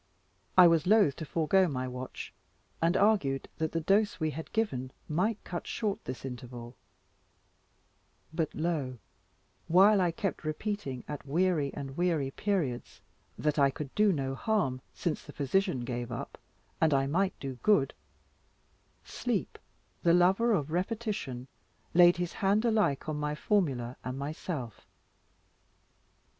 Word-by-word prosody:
I 180 - +10
was 165 -1 +4
loth 205 -9 +5
to 160 - -5
forego 175 +5 +2
my 130 -4 -3
watch, 125 0 -7 0.5
and 170 +3 +3
argued 190 -11 +2
that 160 -1 0
the 165 - -1
dose 195 +1 +2
we 155 -1 0
had 160 +3 -7
given 130 - -1 0.2
might 190 +8 0
cut 175 - -5
short 210 -4 -2
this 130 +1 -6
interval; 120 -1 -8 1.6
but 160 -2 0
lo 150 -6 -2 0.7
while 195 +4 +6
I 180 - +3
kept 195 +2 -3
repeating 155 - -3
at 145 -2 -6
weary 160 -2 +1
and 135 -1 -6
weary 165 -6 0
periods, 135 - -2 0.4
that 150 0 0
I 140 -1 +5
could 135 0 -7
do 210 -1 +4
no 135 -5 -1
harm, 135 - 0
since 170 - -2
the 145 - -11
physician 150 - 0
gave 120 -1 -4
up, 115 - -6 0.4
and 160 -3 +4
I 135 0 +2
might 185 +7 0
do 135 -2 -6
good 180 -11 +3 1.1
sleep, - - -3 0.4
the 170 0 +4
lover 190 +7 +4
of 155 -8 0
repetition, 185 - -3 0.5
laid 175 0 +7
his 175 -1 -3
hand 205 +3 +1
alike 215 - +1
on 155 -1 -2
my 150 0 -2
formula 135 - 0
and 130 +1 -4
myself. 140 - -5
160 Hz, 140 wpm, -30 LUFS, 135-190 Hz, 1.6 s, I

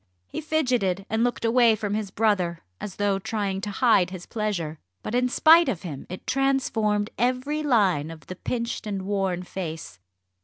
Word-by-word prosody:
He - - -5
fidgeted 250 - 0
and 220 +1 +2
looked 245 -1 -1
away 230 -1 +5
from 205 -1 -3
his 210 -2 -2
brother, 190 -6 0 0.2
as 195 - -6
though 200 -1 +1
trying 195 -1 -2
to 205 - -4
hide 205 -4 +3
his 185 -2 -8
pleasure. 180 -9 -3 0.2
But - - -5
in 250 +1 +2
spite 325 +5 +6
of 175 - -3
him 150 -7 -7
it 185 - -8
transformed 235 -6 +1
every 255 +5 0
line 195 - +2
of 165 -1 -10
the 185 - -7
pinched 235 +2 -3
and 195 -2 -3
worn 190 -2 -1
face. 165 - -6
210 Hz, 175 wpm, -25 LUFS, 185-245 Hz, 0.2 s, spite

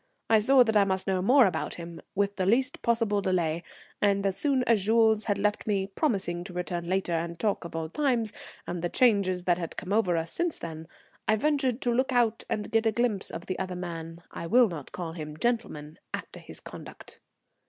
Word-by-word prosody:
I 220 - +7
saw 255 +4 +6
that 220 -2 -1
I 205 - +6
must 190 -1 -1
know 190 -1 0
more 250 +6 +6
about 190 - -1
him, 170 -1 -8
with 200 0 0
the 185 -1 0
least 255 +6 +2
possible 230 -3 +1
delay, 170 -4 0 0.4
and 200 -1 +2
as 195 -1 +1
soon 275 -3 +1
as 225 -5 +2
Jules 220 -1 +4
had 205 -2 0
left 210 +2 0
me, 200 -2 +1
promising 195 - -1
to 185 - -9
return 175 -1 -3
later 190 -1 0
and 170 +1 -2
talk 200 +3 0
of 170 - -8
old 165 +1 -4
times, 245 -7 0 0.3
and 175 -1 -4
the 175 - -1
changes 200 -7 +2
that 175 -1 +2
had 170 - -5
come 190 +2 -3
over 190 -6 +2
us 165 0 -3
since 345 -2 -1
then, 160 -1 -7 0.4
I 220 - +4
ventured 270 0 +1
to 240 - +1
look 260 +3 +1
out 235 -3 +2
and 210 - -3
get 225 0 +3
a - - +3
glimpse 220 -3 0
of 165 - -7
the 185 - -4
other 185 -1 -3
man, 170 -1 -6
I 170 - -6
will 240 +3 +5
not 155 -6 -7
call 175 -3 -5
him 155 -2 -7
gentleman 165 -10 -2 0.2
after - - -9
his - - -7
conduct. - - -11
195 Hz, 215 wpm, -28 LUFS, 175-230 Hz, 0.4 s, I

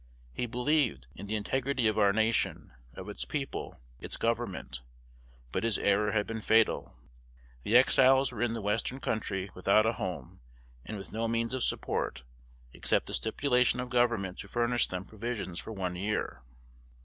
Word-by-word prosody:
He 120 - -2
believed 125 - +1
in 100 - -9
the 110 - -1
integrity 130 +3 0
of 110 0 +1
our 100 -1 +5
nation, 110 - 0 0.2
of - - -8
its - - -5
people, - - -4 0.2
its - - -3
government; 115 - -2 0.7
but - - -1
his 115 -3 +2
error 105 +1 +2
had 105 -1 +1
been 110 -1 -5
fatal. 110 - +2 0.7
The 110 - +5
Exiles 135 +1 +5
were 120 -2 -6
in 120 -1 +1
the 115 - -5
Western 115 +6 -1
Country, 100 -6 -2
without 100 +4 +3
a 115 - +2
home, 90 - -5 0.4
and 110 - -6
with 95 - -9
no 115 +1 -1
means 115 +1 -1
of 130 - -1
support, 60 +1 -1 0.5
except - - +1
the - - -7
stipulation 125 +1 +2
of 125 0 -4
Government 115 -7 +1
to - - -7
furnish 120 +2 +2
them 90 +1 -5
provisions 105 -5 -4
for - - -7
one 95 -4 -3
year. 100 - -2
110 Hz, 165 wpm, -30 LUFS, 100-120 Hz, 0.7 s, our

